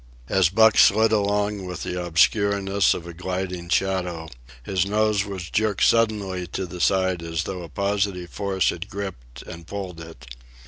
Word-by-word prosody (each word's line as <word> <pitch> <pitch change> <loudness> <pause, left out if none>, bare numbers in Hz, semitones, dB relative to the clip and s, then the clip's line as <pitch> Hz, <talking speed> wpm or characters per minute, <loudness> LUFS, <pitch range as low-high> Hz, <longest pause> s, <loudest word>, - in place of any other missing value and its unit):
As 95 -4 +3
Buck 110 +3 +5
slid 110 +2 +5
along 105 -1 0
with 90 -1 -6
the 90 0 -3
obscureness 100 +3 +2
of 85 - -7
a 85 - -8
gliding 90 0 -4
shadow, 90 -4 -1 0.3
his 95 +5 0
nose 105 0 +1
was 95 -4 -6
jerked 110 -1 +1
suddenly 105 -6 +1
to 95 +2 -4
the 90 -1 -8
side 95 -2 +2
as 85 0 -3
though 90 0 -5
a 85 - -9
positive 100 0 -2
force 95 -3 0
had 85 +3 -7
gripped 95 - -7
and 85 0 -10
pulled 95 -4 -6
it. 80 -7 -11
95 Hz, 165 wpm, -23 LUFS, 85-100 Hz, 0.3 s, Buck